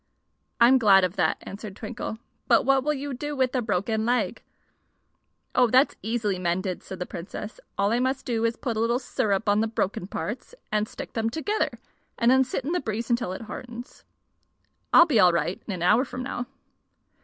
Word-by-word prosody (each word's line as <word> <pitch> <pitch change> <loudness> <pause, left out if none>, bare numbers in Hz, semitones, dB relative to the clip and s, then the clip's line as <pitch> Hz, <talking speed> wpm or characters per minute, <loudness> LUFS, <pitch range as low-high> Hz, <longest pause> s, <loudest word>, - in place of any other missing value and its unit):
"I'm 250 +3 +6
glad 195 -4 +6
of 185 +1 0
that," - - +2
answered 200 -1 -8
Twinkle; 220 0 -5 0.3
"but - - +4
what 270 -1 +3
will 300 +1 +1
you 280 0 -4
do 295 +3 -4
with 260 -2 +1
a 255 - +1
broken 220 +1 -1
leg?" 245 +2 0 1.1
"Oh, 250 -1 +5
that's 260 +5 +4
easily 215 -3 -1
mended," 180 +1 -1
said 190 - -8
the 180 - -4
Princess, 190 +5 -7 0.2
"All 200 +1 +2
I 235 - +2
must 260 +1 -1
do 230 -2 -1
is 230 0 +2
to - - -35
put 235 -4 -2
a - - -1
little 230 +2 +2
syrup 215 -5 -1
on 205 +1 +4
the 225 - +2
broken 205 -5 -2
parts, 240 - -5 0.2
and 215 0 +1
stick - - -8
them 225 -1 0
together, 320 - -1 0.5
and 235 +1 +4
then 265 0 +5
sit 265 0 -4
in 305 - -1
the 360 - +1
breeze 230 0 -3
until 235 -6 0
it 190 - -6
hardens. 240 +2 -9 0.9
I'll 340 - +8
be 275 -10 +2
all 180 -2 +6
right 170 +2 -1
in - - -3
an 180 -3 -3
hour 215 +8 +5
from 255 -2 -6
now." 245 -1 -4
230 Hz, 200 wpm, -26 LUFS, 205-255 Hz, 1.1 s, I'll